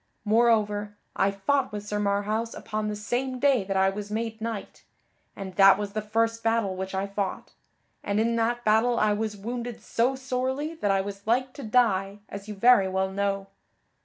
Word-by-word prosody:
Moreover, 210 -2 +2 0.2
I 195 - +3
fought 210 +9 0
with 205 -1 -6
Sir 210 0 -2
Marhaus 210 +3 -1
upon 215 0 -3
the 210 - -2
same 245 +5 -2
day 265 -4 +3
that 195 0 -1
I 190 0 +4
was 205 +1 -6
made 225 +1 -3
knight, 225 -3 -5 0.5
and 195 -2 -7
that 195 -1 +8
was 205 -1 -4
the 215 - -1
first 225 +2 0
battle 225 -4 +1
which 190 +1 -4
I 190 +1 0
fought, 200 -1 -4 0.5
and 205 +1 0
in 230 +1 +1
that 240 +1 0
battle 225 +3 +3
I 215 -1 +3
was 210 0 -3
wounded 235 +3 -5
so 245 +3 0
sorely 260 +4 -2
that 215 -11 -2
I 195 0 +3
was 200 +1 -8
like 255 +3 +1
to - - -9
die 205 -4 +2
as 200 +1 -8
you 210 - -6
very 215 -1 +5
well 190 0 -1
know. 195 0 -1
215 Hz, 190 wpm, -26 LUFS, 200-235 Hz, 0.5 s, that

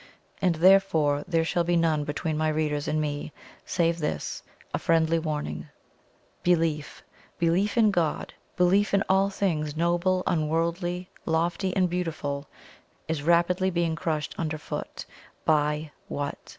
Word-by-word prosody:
And 180 -3 +3
therefore 160 -5 +4
there 165 -2 +1
shall 175 +1 +1
be 175 +1 +1
none 160 -3 +2
between 155 +2 -2
my 155 +1 +1
readers 150 -1 -1
and 155 - 0
me, 150 0 -3 0.4
save 170 -1 +1
this 80 - -3 0.3
a - - 0
friendly 165 0 +2
warning. 150 - -4 0.7
Belief 165 -4 0 0.3
belief 180 +6 +1
in 220 -2 +5
God 170 -5 -1 0.2
belief 195 +3 +3
in 195 - +3
all 195 +1 +3
things 155 -7 -1
noble, 175 +2 +1
unworldly, 170 +3 -1 0.2
lofty, 170 +3 0
and 185 -2 +3
beautiful, 155 -5 -3 0.6
is 160 -2 -2
rapidly 175 +4 +3
being 170 -2 0
crushed 160 -3 -2
underfoot 155 -2 -4 0.4
by 150 0 +1 0.2
what? 145 +2 -5
165 Hz, 130 wpm, -27 LUFS, 155-180 Hz, 0.7 s, in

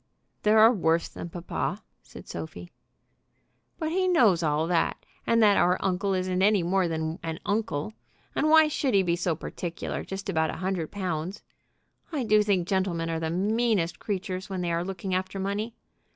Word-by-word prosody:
"There 215 +1 +4
are 225 +2 +8
worse 165 -5 +1
than 170 - -8
papa," 180 +3 -4 0.2
said - - -13
Sophie. 160 +2 -7 1.1
"But 315 -2 -2
he 370 +2 +1
knows 230 - +4
all 155 0 +1
that, 170 -1 0 0.2
and 230 -1 +4
that 205 -2 +5
our 180 +1 +3
uncle 190 +1 0
isn't 185 0 -1
any 200 -2 +4
more 185 +1 +2
than 160 0 -3
an 160 -1 -4
uncle. 210 -4 -1 0.4
And 310 - +2
why 315 0 +7
should 280 -5 0
he 195 - +5
be 170 -1 +1
so 175 -1 -1
particular 170 +2 -5
just 195 0 -6
about 160 -4 +1
a - - -3
hundred 180 -3 -2
pounds? 185 -2 -4 0.7
I 290 -5 -1
do 215 -2 +4
think 195 -4 +1
gentlemen 180 -4 0
are 165 - -1
the 160 0 -2
meanest 205 0 +1
creatures 190 -2 -4
when 190 -2 -3
they 175 -1 -1
are 170 +1 0
looking 190 0 -4
after 185 +1 -2
money! 205 +4 -2
185 Hz, 180 wpm, -27 LUFS, 170-210 Hz, 1.1 s, are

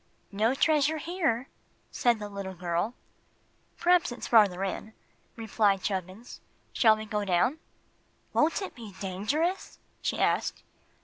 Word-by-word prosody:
"No 220 +5 +1
treasure 305 +1 +2
here," 310 -7 -1 0.4
said 240 -2 +2
the 210 -1 -6
little 200 -2 -6
girl. 175 +6 -2 0.8
"P'raps 355 -5 +3
it's 240 - -6
farther 200 -5 +4
in," 205 +3 -4 0.4
replied 210 -3 +1
Chubbins. 190 +4 -5 0.3
"Shall 220 -2 +5
we 215 - -6
go 210 -1 -2
down?" 200 - +1 0.7
"Won't 325 +6 +2
it 385 - -6
be 220 -5 -10
dangerous?" 245 - -2 0.2
she - - -1
asked. - - 0
220 Hz, 125 wpm, -28 LUFS, 195-280 Hz, 0.8 s, Shall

